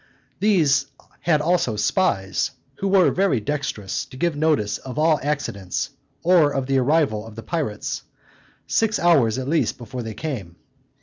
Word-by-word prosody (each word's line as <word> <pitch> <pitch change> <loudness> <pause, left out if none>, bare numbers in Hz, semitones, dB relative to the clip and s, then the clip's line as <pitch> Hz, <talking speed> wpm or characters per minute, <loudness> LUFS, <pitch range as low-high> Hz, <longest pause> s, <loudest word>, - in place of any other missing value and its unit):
These 180 -9 +3 0.3
had 155 -3 +2
also 165 -8 +1
spies, 105 - +1 0.3
who 195 - -1
were 190 -2 +5
very 190 - +2
dextrous 110 -5 -3
to 130 - -13
give 170 +2 0
notice 145 -9 +1
of 130 +1 -8
all 155 -1 +3
accidents, 115 -11 -2 0.3
or 170 -4 +5
of 135 -2 -1
the 135 0 +2
arrival 135 -5 +2
of 110 - -11
the 115 - -8
pirates, 145 -12 -3 0.6
six 225 0 +1
hours, 135 -11 +3
at 130 0 -3
least, 160 +2 +1
before 125 +1 -6
they 110 -2 -6
came. 110 - -5
140 Hz, 150 wpm, -23 LUFS, 115-165 Hz, 0.6 s, were